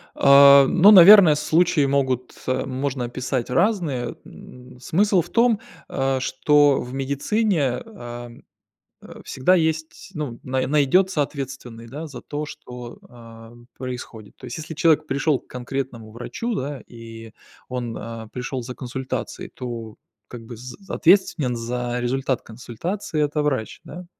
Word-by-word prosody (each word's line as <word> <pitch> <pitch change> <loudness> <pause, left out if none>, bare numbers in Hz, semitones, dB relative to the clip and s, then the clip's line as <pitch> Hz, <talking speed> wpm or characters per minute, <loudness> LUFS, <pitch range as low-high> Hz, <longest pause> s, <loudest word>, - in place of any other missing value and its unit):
А, 140 0 +8
ну, 195 +3 +6
наверное, 190 -4 +9
случаи 155 0 +2
могут 130 -3 -1
э, 130 0 0
можно 130 -1 -3
описать 125 0 -3
разные. 155 - 0
М, 125 0 -14
смысл 185 +7 +2
в - - -11
том, 230 -2 +3 0.3
а, 135 -1 -1
что 145 +2 +3
в 125 +1 -8
медицине, 140 - 0
ам, 120 - -10 0.6
э, - - -12
всегда 160 +8 +2
есть, 160 -1 -2
ну, 140 -6 -5
на 130 0 -1
найдется 150 +4 +2
ответственный, 135 -5 -6
да, 150 +6 -7
за 135 -4 -10
то, 150 +1 -5
что, 125 -4 -10
а, 115 -1 -14 0.2
происходит. 125 -4 -8
То 130 - -11
есть, 120 - -6
если 160 +1 -7
человек 155 -1 +3
пришёл 140 +1 0
к - - -29
конкретному 125 -3 -6
врачу, 215 - -5
да, 140 0 -4
и 115 -1 -11 0.4
он, 120 -2 -5
а, 115 -1 -8
пришел 125 +1 -5
за 125 +1 -7
консультацией, 130 +1 -5
то, 115 -3 -7 0.3
как 120 -2 -9
бы, 120 - -9
з 125 +2 -10
ответственен 165 -8 +2
за 120 +1 -3
результат 130 +1 -1
консультации- 150 - -5
это 150 +1 -1
врач, 130 -7 -2
да. 180 0 -10
130 Hz, 140 wpm, -22 LUFS, 120-155 Hz, 0.6 s, наверное